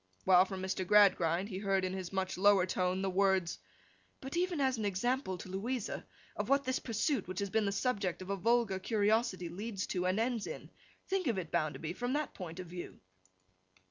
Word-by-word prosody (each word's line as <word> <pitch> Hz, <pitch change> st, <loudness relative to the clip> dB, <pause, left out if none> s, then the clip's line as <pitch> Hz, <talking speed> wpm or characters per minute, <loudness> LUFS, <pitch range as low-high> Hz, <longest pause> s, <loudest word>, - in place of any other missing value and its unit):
While, 185 Hz, 0 st, +7 dB
from 190 Hz, -1 st, -6 dB
Mr. 190 Hz, 0 st, -1 dB
Gradgrind, 190 Hz, -2 st, +4 dB
he 190 Hz, -2 st, -4 dB
heard 195 Hz, -2 st, +1 dB
in 185 Hz, -, -2 dB
his 185 Hz, -2 st, -5 dB
much 190 Hz, -1 st, -1 dB
lower 195 Hz, -1 st, +5 dB
tone 185 Hz, +1 st, 0 dB
the 195 Hz, -, +1 dB
words, 190 Hz, -2 st, +2 dB, 0.6 s
'But 265 Hz, +3 st, -6 dB
even 350 Hz, -2 st, 0 dB
as 260 Hz, -3 st, +1 dB
an -, -, -2 dB
example 205 Hz, +1 st, 0 dB
to -, -, -9 dB
Louisa, 210 Hz, +5 st, -3 dB, 0.3 s
of -, -, -3 dB
what 275 Hz, 0 st, +4 dB
this 260 Hz, 0 st, -1 dB
pursuit 250 Hz, +5 st, -1 dB
which 185 Hz, 0 st, -6 dB
has 200 Hz, -1 st, -2 dB
been 220 Hz, 0 st, +2 dB
the 200 Hz, -, +1 dB
subject 200 Hz, -5 st, -1 dB
of 190 Hz, -, -5 dB
a -, -, +1 dB
vulgar 220 Hz, -1 st, +2 dB
curiosity, 210 Hz, -2 st, +1 dB
leads 195 Hz, +3 st, -4 dB
to 180 Hz, 0 st, 0 dB
and 185 Hz, +3 st, +1 dB
ends 230 Hz, -1 st, 0 dB
in. -, -, -7 dB, 0.4 s
Think 380 Hz, -4 st, 0 dB
of 230 Hz, -5 st, +1 dB
it, 170 Hz, -4 st, -4 dB
Bounderby, 160 Hz, +1 st, -1 dB
in 245 Hz, +1 st, 0 dB
that 300 Hz, -1 st, -1 dB
point 175 Hz, -2 st, -7 dB
of 185 Hz, -, -5 dB
view. 175 Hz, +1 st, -8 dB
195 Hz, 205 wpm, -33 LUFS, 185-230 Hz, 0.6 s, While